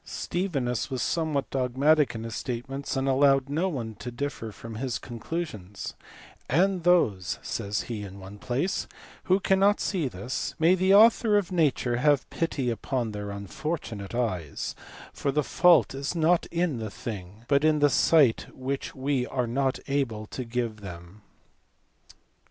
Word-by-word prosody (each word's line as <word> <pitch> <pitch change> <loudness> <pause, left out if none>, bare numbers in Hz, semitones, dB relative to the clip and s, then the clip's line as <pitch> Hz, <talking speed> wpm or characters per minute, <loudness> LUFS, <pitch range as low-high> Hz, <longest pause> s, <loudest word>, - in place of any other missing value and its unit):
Stevinus 135 - -2
was 130 -3 -2
somewhat 155 -5 -1
dogmatic 135 +3 +2
in 110 - -5
his 115 -1 -6
statements, 135 +4 -4
and 135 +1 0
allowed 135 0 +4
no 165 +6 0
one 120 -9 -4
to 125 - -6
differ 120 -3 -4
from 115 +1 -9
his 130 0 -2
conclusions, 115 - -6 0.6
"and 185 +4 +2
those," 105 - +2
says 100 0 -2
he, 115 -3 -5
in 100 -1 -8
one 95 +2 -10
place, 135 - -1 0.2
" - - -21
who 185 +1 +3
cannot 195 +1 +3
see 175 -8 0
this, 120 +3 -4
may 165 +2 +5
the 185 +1 +2
Author 215 +1 +6
of 195 -4 -1
nature 140 -8 +1
have 145 +1 +3
pity 140 -7 -1
upon 120 +1 -2
their 105 -1 -5
unfortunate 100 - -5
eyes, 90 -11 -2 0.4
for 140 - -1
the 150 +2 +1
fault 170 - +4
is 140 +5 -3
not 170 +1 +3
in 170 -7 -1
the 110 -1 -4
thing, 105 0 -8
but 140 0 +3
in 155 -1 +4
the 145 0 +5
sight 145 -3 +4
which 135 +1 -4
we 135 -2 0
are 125 -2 -1
not 130 +3 0
able 130 -7 -1
to 130 - -6
give 115 -2 -2
them." 90 +1 -10
130 Hz, 155 wpm, -27 LUFS, 115-155 Hz, 0.6 s, Author